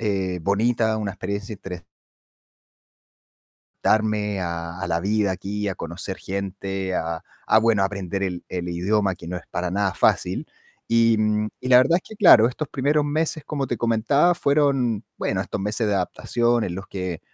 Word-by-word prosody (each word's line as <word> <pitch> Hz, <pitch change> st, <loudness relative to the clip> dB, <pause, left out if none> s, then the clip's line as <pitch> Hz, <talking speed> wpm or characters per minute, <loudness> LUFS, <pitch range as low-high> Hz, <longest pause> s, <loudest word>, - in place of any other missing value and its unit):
eh, 95 Hz, -4 st, -1 dB
bonita, 110 Hz, +3 st, +1 dB
una 105 Hz, -2 st, -2 dB
experiencia 100 Hz, +3 st, -5 dB
interes 90 Hz, -3 st, -8 dB, 2.0 s
darme 105 Hz, -2 st, +1 dB
a 85 Hz, 0 st, -4 dB
a -, -, -2 dB
la 85 Hz, -1 st, 0 dB
vida 100 Hz, +1 st, +1 dB
aquí, 100 Hz, +3 st, -3 dB
a 95 Hz, -, -2 dB
conocer 90 Hz, +3 st, -6 dB
gente, 95 Hz, -1 st, -4 dB
a 80 Hz, -1 st, -2 dB, 0.2 s
a 110 Hz, -, +5 dB
bueno, 110 Hz, -3 st, +3 dB
aprender 100 Hz, -1 st, -3 dB
el 90 Hz, -2 st, -2 dB
el 90 Hz, -1 st, -4 dB
idioma, 95 Hz, +3 st, +1 dB
que 85 Hz, -, -12 dB
no 90 Hz, -, -3 dB
es 90 Hz, -, -7 dB
para 90 Hz, 0 st, -2 dB
nada 95 Hz, 0 st, 0 dB
fácil. -, -, +1 dB, 0.4 s
Y 115 Hz, -1 st, +4 dB, 0.4 s
y -, -, -4 dB
la 125 Hz, -1 st, +8 dB
verdad 140 Hz, +7 st, +4 dB
es 180 Hz, -, -3 dB
que 220 Hz, -, -10 dB
claro, 120 Hz, -, +7 dB
estos 145 Hz, +4 st, -4 dB
primeros 145 Hz, +2 st, +1 dB
meses, 155 Hz, +1 st, -1 dB
como 140 Hz, -2 st, -2 dB
te 120 Hz, -, -2 dB
comentaba, 120 Hz, +10 st, +3 dB
fueron, 140 Hz, -8 st, +1 dB
bueno, -, -, -1 dB
estos -, -, -5 dB
meses 105 Hz, +3 st, -1 dB
de 105 Hz, -, +1 dB
adaptación 120 Hz, +5 st, 0 dB
en 85 Hz, -, -3 dB
los 95 Hz, +2 st, -7 dB
que 90 Hz, -3 st, -4 dB
100 Hz, 170 wpm, -23 LUFS, 95-120 Hz, 2.0 s, la